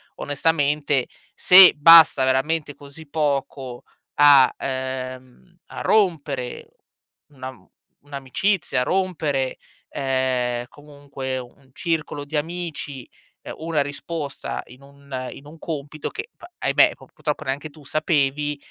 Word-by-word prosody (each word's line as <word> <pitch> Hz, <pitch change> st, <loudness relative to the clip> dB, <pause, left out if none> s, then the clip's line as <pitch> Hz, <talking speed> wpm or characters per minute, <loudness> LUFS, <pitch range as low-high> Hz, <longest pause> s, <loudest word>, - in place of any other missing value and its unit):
onestamente, 145 Hz, -2 st, 0 dB, 0.3 s
se 185 Hz, 0 st, +9 dB
basta 160 Hz, -2 st, +7 dB
veramente 145 Hz, +3 st, 0 dB
così 145 Hz, +2 st, -14 dB
poco 140 Hz, -4 st, -3 dB, 0.3 s
a, 140 Hz, -3 st, +6 dB
uhm, 130 Hz, +5 st, -6 dB
a -, -, -9 dB
rompere 150 Hz, -, 0 dB, 0.6 s
una 130 Hz, -2 st, -8 dB
mhmm, -, -, -22 dB, 0.4 s
un'amicizia, 145 Hz, +3 st, -1 dB
a -, -, +1 dB
rompere, 155 Hz, -7 st, -1 dB, 0.4 s
uhm, 130 Hz, -2 st, -1 dB
comunque 140 Hz, -2 st, -8 dB
un 130 Hz, +2 st, -12 dB
circolo 155 Hz, -4 st, -3 dB
di 150 Hz, +2 st, -7 dB
amici, 150 Hz, -5 st, -4 dB, 0.4 s
uhm, -, -, -7 dB
una 160 Hz, -2 st, -1 dB
risposta, 145 Hz, +1 st, -5 dB
in 125 Hz, +2 st, -16 dB
un 140 Hz, -2 st, -8 dB
in 140 Hz, -, -13 dB
un 155 Hz, +3 st, -13 dB
compito 155 Hz, -2 st, -6 dB
che, 430 Hz, +2 st, -7 dB
v -, -, -25 dB, 0.2 s
ahimè, -, -, +3 dB
p -, -, -17 dB
purtroppo 155 Hz, -1 st, -4 dB
neanche 140 Hz, +3 st, -4 dB
tu 150 Hz, 0 st, -18 dB
sapevi, 145 Hz, -1 st, 0 dB
145 Hz, 120 wpm, -22 LUFS, 130-155 Hz, 0.6 s, se